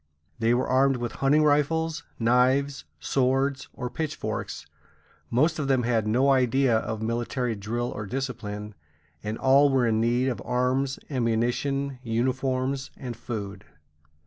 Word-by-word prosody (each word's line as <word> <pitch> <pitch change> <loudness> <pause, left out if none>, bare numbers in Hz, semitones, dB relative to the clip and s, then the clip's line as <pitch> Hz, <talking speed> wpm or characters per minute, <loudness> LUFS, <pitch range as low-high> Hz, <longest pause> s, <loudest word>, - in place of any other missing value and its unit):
They 115 +1 +3
were 125 - 0
armed 135 +1 +3
with 120 -1 -3
hunting 145 +3 +4
rifles, 155 +2 +1 0.2
knives, 130 +4 +2
swords, 135 +1 0
or 125 - -5
pitchforks; 155 +4 -4 0.6
most 155 +7 +2
of 140 - -1
them 130 -2 +2
had 115 -2 +1
no 130 +6 +3
idea 130 -1 +3
of 110 0 -4
military 120 +2 -1
drill 115 +4 -3
or 105 -1 -6
discipline, 110 -4 -4 0.5
and 105 +1 -3
all 140 +2 +5
were 130 -2 +2
in 110 -1 +2
need 120 +3 +2
of 125 - -2
arms, 130 +2 0
ammunition, 130 +3 0
uniforms, 130 +3 -1
and 125 -3 -6
food. 105 -4 -6
125 Hz, 135 wpm, -26 LUFS, 115-135 Hz, 0.6 s, all